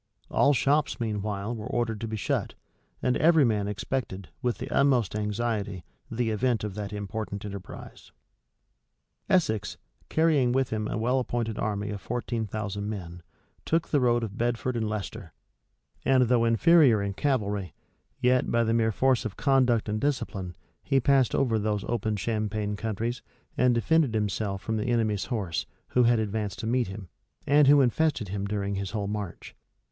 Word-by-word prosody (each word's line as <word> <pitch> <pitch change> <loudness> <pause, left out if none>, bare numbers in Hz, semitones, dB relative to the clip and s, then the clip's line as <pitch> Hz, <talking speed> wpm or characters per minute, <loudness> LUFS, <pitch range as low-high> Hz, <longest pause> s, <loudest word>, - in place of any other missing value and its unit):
All 145 - +4
shops, 145 +2 +1
meanwhile, 105 -1 -2
were 110 -1 -6
ordered 115 -3 -2
to 115 - -3
be 110 0 -4
shut; - - -2 0.5
and 125 - +2
every 160 -3 +5
man 105 -3 +1
expected, 100 -2 -4
with 120 -1 0
the - - -6
utmost 125 -8 +2
anxiety, 105 -3 -2 0.3
the 115 -1 -1
event 115 +1 0
of 105 -2 -3
that 100 0 -5
important 105 0 -5
enterprise.[] 100 -2 -9 1.2
Essex, 110 - +1 0.3
carrying 150 -6 +3
with 135 0 +1
him 110 -1 -1
a - - -3
well 125 +4 +1
appointed 115 -3 -2
army 105 -1 -2
of 100 -1 -6
fourteen 120 -1 -3
thousand 105 0 -4
men, 90 -5 -6 0.4
took 165 0 0
the 145 - +3
road 120 -2 +2
of 105 -1 -6
Bedford 120 +1 -1
and 110 -2 -1
Leicester: 100 -5 -5 0.7
and 130 -1 +4
though 120 -2 +3
inferior 125 +1 +5
in 100 0 -2
cavalry, 105 - -1 0.4
yet, 125 0 +2
by 115 0 +2
the 115 0 +1
mere 115 -1 +2
force 130 +2 +2
of 110 -2 -5
conduct 130 -5 +2
and 105 +1 -2
discipline, 100 -10 -2 0.3
he 135 -1 +2
passed 135 0 +3
over 115 -5 +2
those 105 -1 -1
open 110 -2 -1
champaign 105 0 -2
country, 110 +2 -2 0.4
and 125 -1 +3
defended 140 0 +2
himself 100 -1 -1
from 110 0 -1
the 105 - -2
enemy's 110 -4 +1
horse, 95 - -2 0.2
who 125 - +3
had 120 0 +4
advanced 105 -1 -2
to - - -5
meet 120 +1 +1
him, 95 0 -8 0.4
and 145 0 +5
who 145 0 +7
infested 135 - +1
him 100 0 -3
during 100 0 -2
his 100 -1 -3
whole 105 -3 -3
march. 105 -3 -6
110 Hz, 165 wpm, -27 LUFS, 105-125 Hz, 1.2 s, who